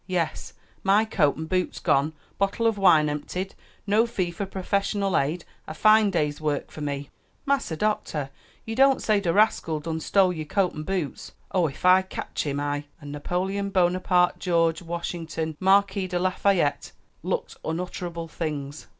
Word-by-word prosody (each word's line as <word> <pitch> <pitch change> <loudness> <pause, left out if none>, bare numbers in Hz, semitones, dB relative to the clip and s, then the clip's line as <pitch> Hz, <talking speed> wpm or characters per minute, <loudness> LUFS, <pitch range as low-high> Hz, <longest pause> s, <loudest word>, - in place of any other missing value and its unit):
"Yes, 180 -4 -2 0.3
my 200 +3 +4
coat 160 -10 +2
and 160 +1 -6
boots 185 +1 -1
gone, 140 +3 +1 0.3
bottle 200 +4 0
of 225 -1 +3
wine 160 -6 +5
emptied, 180 +6 -4 0.3
no 215 +3 +3
fee 185 -6 -2
for 195 +3 -4
professional 195 0 -1
aid 155 +5 0 0.2
a 155 - -6
fine 215 +3 +5
day's 150 -5 -1
work 150 -2 -2
for 155 - -9
me." 140 -1 -4 0.3
"Massa 275 - 0
Doctah! 155 -9 -1 0.3
you 225 - -4
don't 270 +1 +5
say 215 -2 +3
de 180 -4 0
rascal 180 -6 +2
done 160 +1 -4
stole 185 +2 +3
yer 160 -2 -4
coat 185 +4 0
an' 155 - -6
boots? 170 -3 -4 0.2
Oh, 180 -3 +2
ef 140 +4 -8
I 185 +1 +7
cotch 190 -4 -5
him, 140 0 -1
I 145 0 -2
" - - -38
and 145 -2 -9
Napoleon 185 +7 -2
Bonaparte 180 -1 +2
George 165 -2 +1
Washington 165 -2 -4
Marquis 195 0 +3
de 180 -1 -2
Lafayette 185 -3 +1 0.3
looked - - -3
unutterable 170 0 -4
things. 150 -3 -5
180 Hz, 165 wpm, -25 LUFS, 155-195 Hz, 0.3 s, I